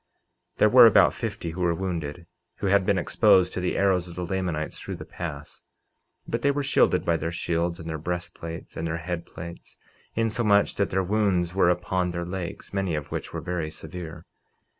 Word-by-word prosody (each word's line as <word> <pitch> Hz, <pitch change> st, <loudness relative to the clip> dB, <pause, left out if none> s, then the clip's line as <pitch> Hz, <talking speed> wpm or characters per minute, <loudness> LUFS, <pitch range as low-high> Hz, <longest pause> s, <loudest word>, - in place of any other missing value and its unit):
49:24 -, -, -44 dB
There -, -, +5 dB
were -, -, +9 dB
about -, -, +6 dB
fifty 85 Hz, -, -4 dB
who 90 Hz, +3 st, -6 dB
were 85 Hz, -1 st, +2 dB
wounded, 85 Hz, -3 st, -4 dB, 0.3 s
who -, -, -5 dB
had 100 Hz, -1 st, +3 dB
been 100 Hz, -, +3 dB
exposed 90 Hz, +1 st, +4 dB
to -, -, -2 dB
the 90 Hz, 0 st, -1 dB
arrows 95 Hz, -3 st, +2 dB
of 85 Hz, -, -10 dB
the 90 Hz, -, -3 dB
Lamanites 85 Hz, -4 st, -2 dB
through -, -, -5 dB
the -, -, -9 dB
pass, 75 Hz, -3 st, -7 dB, 0.6 s
but 115 Hz, -, -2 dB
they 140 Hz, -, +3 dB
were 140 Hz, 0 st, 0 dB
shielded -, -, +3 dB
by 85 Hz, -1 st, +2 dB
their 80 Hz, +1 st, -3 dB
shields, 85 Hz, -1 st, -1 dB
and 80 Hz, -, -8 dB
their 80 Hz, -1 st, -3 dB
breastplates, 85 Hz, 0 st, -6 dB
and 80 Hz, -, -3 dB
their 80 Hz, 0 st, -2 dB
head 85 Hz, +1 st, -4 dB
plates, 85 Hz, +1 st, -10 dB, 0.4 s
insomuch 110 Hz, -2 st, +2 dB
that 100 Hz, -3 st, 0 dB
their 95 Hz, +1 st, +1 dB
wounds 95 Hz, -3 st, +1 dB
were 95 Hz, -2 st, +4 dB
upon 90 Hz, +1 st, 0 dB
their 85 Hz, 0 st, -3 dB
legs, 90 Hz, +1 st, -6 dB
many 95 Hz, -4 st, 0 dB
of 75 Hz, -2 st, -5 dB
which -, -, -4 dB
were -, -, -4 dB
very 85 Hz, -3 st, -3 dB
severe. 80 Hz, +1 st, -8 dB
90 Hz, 200 wpm, -26 LUFS, 85-95 Hz, 0.6 s, were